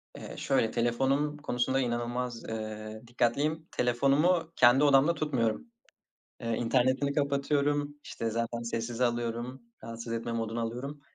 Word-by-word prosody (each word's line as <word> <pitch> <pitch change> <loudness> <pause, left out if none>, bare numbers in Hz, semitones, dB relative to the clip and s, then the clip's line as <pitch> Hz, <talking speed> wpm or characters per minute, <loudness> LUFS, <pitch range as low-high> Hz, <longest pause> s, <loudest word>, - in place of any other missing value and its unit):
Eee, - - -8
şöyle, 110 - +1
telefonum 135 +5 +1
konusunda 130 -2 0
inanılmaz, 120 -1 -2
eee, 110 0 -5
dikkatliyim. 145 +7 0
Telefonumu 145 +8 +2
kendi 125 +4 +6
odamda 145 +3 +5
tutmuyorum. 135 - -1 0.7
Eee, 115 -1 -1
internetini 130 +4 +2
kapatıyorum. 145 0 +1
İşte 115 -1 -3
zaten 115 +1 -2
sessize 115 +1 -2
alıyorum. 120 +2 -2 0.2
Rahatsız 115 0 -6
etme 115 0 -3
moduna 115 0 -2
alıyorum. 125 +6 -4
120 Hz, 120 wpm, -30 LUFS, 115-140 Hz, 0.7 s, kendi